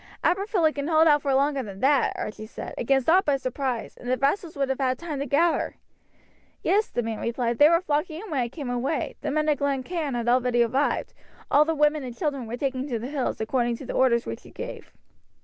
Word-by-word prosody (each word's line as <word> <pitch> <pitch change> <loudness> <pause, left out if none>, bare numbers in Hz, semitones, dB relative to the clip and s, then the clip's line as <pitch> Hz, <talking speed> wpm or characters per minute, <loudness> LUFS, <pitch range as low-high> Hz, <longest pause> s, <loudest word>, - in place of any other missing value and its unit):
"Aberfilly 360 -3 +2
can 285 0 -3
hold 320 0 +5
out 295 -1 +5
for 275 - -1
longer 280 0 +2
than 200 -5 -8
that," 275 0 +3
Archie 215 0 -5
said, - - -7
"against 270 +1 +1
aught 365 +4 +5
but 280 -2 +2
surprise, 255 -2 -3
and 245 - -7
the 255 - +2
vassals 315 +5 0
would 275 -1 +1
have 265 0 -1
had 255 -1 +1
time 315 -5 -5
to 280 - -3
gather." 325 +6 +1 0.9
"Yes," 420 +2 +2
the 240 - -2
man 225 -1 -4
replied, 235 0 -1
"they 295 - +8
were 335 +1 +4
flocking 310 0 -1
in 420 -2 -9
when 285 - 0
I 240 -1 0
came 275 -2 -5
away; 255 +5 -2
the 290 - -2
men 305 +1 0
of 295 -3 +2
Glen 275 -2 0
Cairn 315 -5 -3
had 235 -1 -2
already 245 -1 +3
arrived; 260 +5 0 0.4
all 295 +1 +6
the 325 +1 0
women 300 0 +2
and 245 -2 -7
children 280 -8 -2
were 235 +2 -4
taking 265 0 -2
to 245 -5 -2
the 235 +4 -5
hills, 280 -3 -2
according 235 +1 0
to 270 - -9
the - - -5
orders 235 -3 +3
which 115 - -6
you - - -14
gave." - - -8
275 Hz, 235 wpm, -25 LUFS, 245-305 Hz, 0.9 s, they